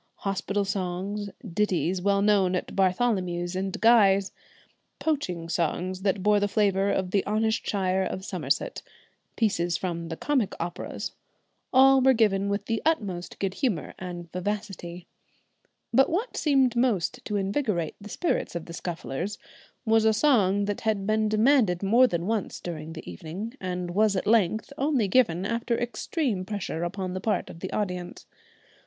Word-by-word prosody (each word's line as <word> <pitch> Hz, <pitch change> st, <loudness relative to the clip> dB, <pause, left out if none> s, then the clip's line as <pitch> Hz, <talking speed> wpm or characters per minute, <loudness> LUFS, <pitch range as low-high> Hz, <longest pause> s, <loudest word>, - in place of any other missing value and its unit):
Hospital 195 Hz, +1 st, -1 dB
songs, 195 Hz, +2 st, -3 dB, 0.2 s
ditties 185 Hz, -1 st, 0 dB
well 200 Hz, +1 st, +2 dB
known 195 Hz, -3 st, +3 dB
at 180 Hz, -, -4 dB
Bartholomew's 185 Hz, -3 st, +1 dB
and 190 Hz, 0 st, -3 dB
Guy's; 200 Hz, -4 st, +5 dB, 0.7 s
poaching 180 Hz, -, -2 dB
songs 180 Hz, +2 st, -1 dB
that 195 Hz, -1 st, 0 dB
bore 210 Hz, 0 st, +4 dB
the 205 Hz, -, +1 dB
flavour 200 Hz, -1 st, +2 dB
of 185 Hz, -2 st, -1 dB
the 200 Hz, -1 st, +2 dB
honest 220 Hz, +1 st, 0 dB
shire 190 Hz, -2 st, +1 dB
of 190 Hz, 0 st, -3 dB
Somerset; 175 Hz, -, -2 dB, 0.5 s
pieces 175 Hz, -6 st, +1 dB
from 170 Hz, -2 st, -4 dB
the 165 Hz, -1 st, -5 dB
comic 270 Hz, -9 st, 0 dB
operas; 170 Hz, +1 st, -4 dB, 0.6 s
all 265 Hz, +1 st, +6 dB
were 265 Hz, +1 st, +6 dB
given 200 Hz, -4 st, +2 dB
with 200 Hz, +1 st, -2 dB
the 225 Hz, -1 st, -1 dB
utmost 200 Hz, -, -1 dB
good 195 Hz, -1 st, -2 dB
humour 210 Hz, -, -1 dB
and 175 Hz, -2 st, -7 dB
vivacity. 180 Hz, -2 st, -4 dB, 0.9 s
But 270 Hz, -, +5 dB
what 410 Hz, +9 st, -2 dB
seemed 270 Hz, -5 st, +3 dB
most 240 Hz, -1 st, +1 dB
to 210 Hz, -, -3 dB
invigorate 195 Hz, -, -1 dB
the 210 Hz, -, -9 dB
spirits 335 Hz, -, -1 dB
of 170 Hz, -, -4 dB
the 170 Hz, -, -9 dB
Scufflers 175 Hz, +2 st, -4 dB, 0.5 s
was 220 Hz, 0 st, +4 dB
a 220 Hz, 0 st, +4 dB
song 205 Hz, -6 st, +3 dB
that 205 Hz, 0 st, -3 dB
had 215 Hz, -3 st, 0 dB
been 215 Hz, +1 st, +1 dB
demanded 215 Hz, -5 st, +3 dB
more 235 Hz, +6 st, +5 dB
than 170 Hz, -5 st, -2 dB
once 215 Hz, -1 st, -2 dB
during 160 Hz, -2 st, -6 dB
the 160 Hz, -, -9 dB
evening 165 Hz, -, -6 dB
and 180 Hz, -1 st, -3 dB
was 210 Hz, +2 st, +3 dB
at 185 Hz, -, -1 dB
length 220 Hz, +3 st, +2 dB
only 270 Hz, -6 st, +2 dB
given 190 Hz, -5 st, +2 dB
after 230 Hz, +2 st, -1 dB
extreme 240 Hz, -, -2 dB
pressure 195 Hz, -4 st, -4 dB
upon 185 Hz, +1 st, -3 dB
the 185 Hz, -, -4 dB
part 215 Hz, +1 st, -1 dB
of 165 Hz, -, -12 dB
the 190 Hz, -, -5 dB
audience. 180 Hz, -4 st, -4 dB
200 Hz, 155 wpm, -27 LUFS, 180-220 Hz, 0.9 s, all